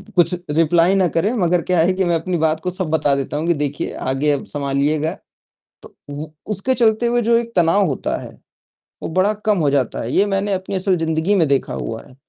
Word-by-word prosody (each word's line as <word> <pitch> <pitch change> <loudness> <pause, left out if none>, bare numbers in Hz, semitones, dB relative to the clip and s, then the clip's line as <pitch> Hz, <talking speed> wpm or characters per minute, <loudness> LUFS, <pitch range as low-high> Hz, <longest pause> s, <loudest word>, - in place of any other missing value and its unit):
कुछ 175 +1 +3 0.2
रिप्लाई 165 +4 +3
ना 185 -2 +3
करे 180 +7 0
मगर 180 -5 +1
क्या 180 -1 0
है 180 +3 +3
कि 190 0 0
मैं 170 -1 +1
अपनी 175 +2 -2
बात 160 0 +1
को 180 - -3
सब 185 -3 -4
बता 150 -3 +1
देता 140 +1 -3
हूँ 160 +3 -2
कि 170 - +4
देखिए 145 -1 -3
आगे 135 +3 0
अब 140 - -2
सँभालिएगा। 145 +2 -1 0.7
तो - - -15 0.2
व 145 +2 -5 0.2
उसके 210 +6 0
चलते 230 -1 +2
हुए 240 0 +2
जो 230 +1 +3
एक 235 0 -5
तनाव 175 +3 +4
होता 135 - -2
है, - - -9 0.7
वो - - -3
बड़ा 190 +4 +2
कम 210 -2 +3
हो 150 -3 +2
जाता 140 -3 0
है 115 - -4
ये 200 - +3
मैंने 200 0 -1
अपनी 190 +1 -5
असल 185 0 +1
ज़िन्दगी 165 +4 0
में 170 -5 +3
देखा 140 -1 0
हुआ 115 0 -5
है, 130 - -18
170 Hz, 225 wpm, -19 LUFS, 150-195 Hz, 0.7 s, कि